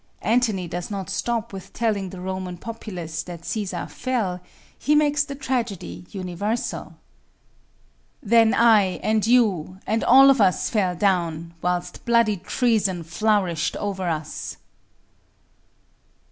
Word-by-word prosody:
Antony 215 -4 +1
does 175 +1 -5
not 195 -3 -5
stop 235 -4 -2
with 190 -1 -9
telling 210 -5 -1
the 185 - -9
Roman 185 -1 -4
populace 180 -7 -6
that 170 0 -9
Cæsar 195 -4 -3
fell 215 -9 -2 0.3
he 300 - +1
makes 295 0 +3
the 280 -1 -7
tragedy 230 - -3
universal: 190 0 -4 1.3
Then 225 +1 +5
I, 215 -5 +4
and 215 0 +1
you, 200 -8 +2
and 220 +1 0
all 270 +2 +8
of 265 -4 +2
us 185 -2 +2
fell 190 -5 +1
down, 170 -3 0
Whilst 180 0 -2
bloody 235 -3 +3
treason 200 -4 0
flourished 180 -2 0
over 190 -3 -2
us. 155 -2 -4
200 Hz, 120 wpm, -23 LUFS, 180-230 Hz, 1.3 s, all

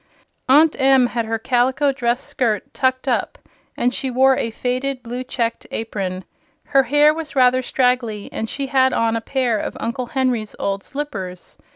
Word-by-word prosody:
Aunt 305 +4 +6
Em 265 -1 +5
had 235 -1 -2
her 225 0 -1
calico 255 +5 +1
dress 245 -1 -1
skirt 240 +2 -1
"tucked 260 0 0
up," 245 - -1 0.4
and 245 +1 +1
she 265 - -2
wore 265 +1 +4
a 230 - -1
faded, 255 +3 -3
blue 245 +2 -5
checked 235 -2 -3
apron. 190 -4 -4 0.4
Her 275 -1 +3
hair 295 +3 +4
was 310 -2 -7
rather 255 -1 +4
straggly 250 -5 0
and 225 - -3
she 275 - -3
had 260 -1 +2
on 230 0 +1
a 230 - -2
pair 245 -3 0
of - - -5
Uncle 240 +2 -3
Henry's 245 -5 -1
old 195 0 -2
slippers. 195 -11 -6
250 Hz, 170 wpm, -20 LUFS, 230-265 Hz, 0.4 s, Aunt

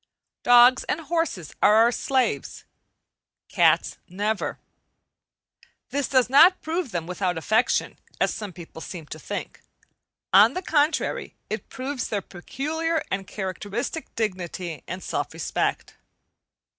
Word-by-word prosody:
Dogs 245 +1 +6
and 325 - -2
horses 315 - -2
are 210 - +6
our 230 +2 +6
slaves; 250 - -1 0.9
cats - - +3
never. 205 +3 -2 1.3
This 285 -1 -1
does 260 -3 +3
not 325 +8 +7
prove 325 -1 -2
them 175 -5 -3
without 180 0 -2
affection, 220 +9 +1 0.2
as - - +2
some 210 -3 -6
people 170 -2 -11
seem 170 -3 -7
to 155 - -9
think; - - -6 0.7
on 210 +7 +7
the 365 - -3
contrary, 305 -2 0 0.2
it - - -4
proves 260 0 -4
their 205 -3 -2
peculiar 315 - -3
and 195 -1 -2
characteristic 205 - -4
dignity 185 -6 -3
and 185 +2 -6
self - - -3
respect. - - -2
220 Hz, 120 wpm, -25 LUFS, 185-285 Hz, 1.3 s, not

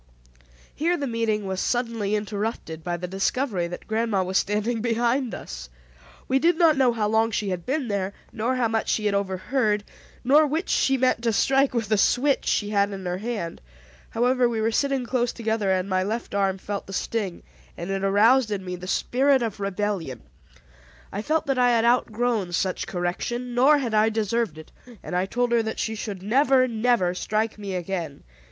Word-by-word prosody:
Here 340 +3 0
the 285 - -2
meeting 225 -4 -1
was 190 -1 -2
suddenly 230 -4 -1
interrupted 205 -6 -4
by 175 -1 -2
the 180 +1 -5
discovery 195 0 -1
that 175 - -8
grandma 220 -3 0
was 185 +1 +1
standing 215 +3 -1
behind 240 +2 0
us. - - -8 0.6
We 265 +1 +2
did 335 +3 +3
not 330 -3 +5
know 260 -3 +4
how 220 -3 -1
long 220 +1 +2
she 210 -2 -2
had 180 -2 -4
been 270 0 -1
there 200 -2 -1 0.2
nor 235 +4 -1
how 250 -2 +1
much 225 0 -1
she 215 - 0
had 205 - +2
overheard, 205 +3 0 0.4
nor 295 +5 +5
which 315 +6 -2
she 270 0 +2
meant 255 -2 +2
to 235 -1 +1
strike 270 +5 +2
with 230 -3 0
the 215 0 +2
switch 275 +6 +2
she 205 0 +1
had 200 -1 +2
in 190 -1 -7
her 180 +1 -2
hand. 210 -6 -4 0.5
However, 245 +1 +2
we 230 -2 -2
were 220 +1 +1
sitting 270 +1 0
close 245 -1 0
together 220 -3 -1
and 185 0 0
my 185 -1 +1
left 220 +5 -3
arm 195 -1 +1
felt 200 +1 -5
the 195 - -8
sting, 200 -2 -3 0.3
and 175 +3 -5
it 195 0 -2
aroused 220 +5 +4
in 200 -3 -3
me 180 0 -4
the 180 +1 -9
spirit 265 +5 +2
of 220 -3 -4
rebellion. 195 - -3 0.9
I 200 - -3
felt 310 +7 0
that 270 -2 0
I 245 0 +5
had 230 -1 +3
outgrown 235 -5 +1
such 185 +1 -1
correction, 240 +8 -3
nor 270 +5 +5
had 245 -6 -2
I 215 +1 +4
deserved 220 -4 -1
it; 155 - -12 0.3
and - - -5
I 185 +1 +1
told 245 +3 0
her 235 -1 +4
that 220 0 -4
she 220 - -2
should 205 -4 -6
never, 255 +4 +3
never 225 -6 +1
strike 215 +4 -2
me 200 -2 -4
again. 175 -5 -4
220 Hz, 195 wpm, -25 LUFS, 195-245 Hz, 0.9 s, not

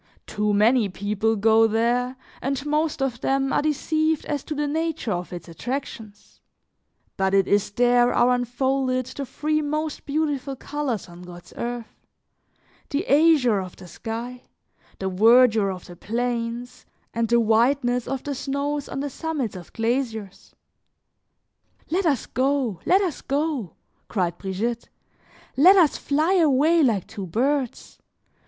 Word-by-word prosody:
Too 210 0 -1
many 215 +2 +3
people 210 +3 -1
go 220 +2 +4
there, 240 +3 0 0.3
and 275 +1 -2
most 300 -1 0
of 250 -3 -3
them 270 0 0
are - - +2
deceived 310 +1 0
as 290 -2 -3
to 310 - -4
the 295 0 -1
nature 315 -4 -2
of 175 -1 -3
its 175 0 -8
attractions; 220 +1 -7 0.8
but 190 0 +1
it 195 -1 +3
is 205 0 +2
there, 245 +2 +3
are 245 +1 +3
unfolded 255 +1 0
the 265 +2 -6
three 305 +4 -1
most 305 +1 -3
beautiful 285 -2 -1
colors 270 -5 -4
on 175 0 -13
God's 175 -1 -12
earth: 235 -1 -6 0.8
the 295 +7 -2
azure 285 -8 +4
of 185 -2 -7
the 180 - -13
sky, 235 +7 -6 0.6
the 190 - -3
verdure 220 +2 +5
of 185 -1 -6
the 175 - -11
plains, 235 +3 -3 0.3
and 230 0 0
the 235 0 +4
whiteness 245 +2 +2
of 270 -1 -3
the 290 - -3
snows 280 +1 -3
on 275 - -4
the 285 - -3
summits 295 - -3
of 180 -2 -10
glaciers. 225 -4 -3 1.4
"Let 360 +1 +1
us 275 -7 +1
go, 260 -7 0
let 380 +2 +5
us 360 -7 -2
go," 280 - -2 0.3
cried 175 -5 -2
Brigitte, 220 +5 -3 0.7
"let 360 +8 +7
us 335 -7 +4
fly 310 +6 +1
away 320 +1 +4
like 225 - +2
two 195 -2 -7
birds. 260 - -2
245 Hz, 145 wpm, -24 LUFS, 220-285 Hz, 1.4 s, let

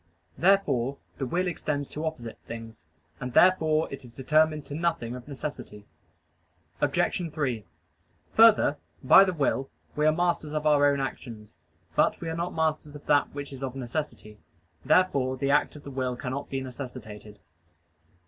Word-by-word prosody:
Therefore 140 -7 +2 0.2
the 135 - -2
will 180 +8 0
extends 150 -5 -2
to 155 +2 -3
opposite 120 -8 -6
things, 115 -6 -9 0.3
and 125 -1 -5
therefore 160 -4 +4
it 140 0 -7
is 120 -2 -14
determined 155 +2 +2
to - - -8
nothing 160 -7 -1
of 125 +1 -10
necessity. 135 -7 -7 1.0
Obj. 170 -3 0
3: 130 - -2 0.7
Further, 220 -9 +6 0.3
by 130 +8 +8
the 190 - +1
will 135 -4 0 0.3
we 150 +1 +2
are - - +6
masters 170 -2 -1
of 155 0 -2
our 145 -1 +5
own 140 - -1
actions. 115 -5 -6 0.4
But - - +2
we 165 - -4
are 160 - -3
not 170 +2 -3
masters 155 -2 -1
of 145 - -11
that 145 -1 +2
which 140 -1 -6
is 135 - -9
of 135 -1 -4
necessity. 125 -5 -5 0.4
Therefore 140 -4 +2
the 140 +1 0
act 145 - +2
of 145 - -11
the 140 - -8
will 130 -2 -2
cannot 130 +3 -5
be 135 -1 -2
necessitated. 120 -5 -9
145 Hz, 160 wpm, -27 LUFS, 125-155 Hz, 1.0 s, by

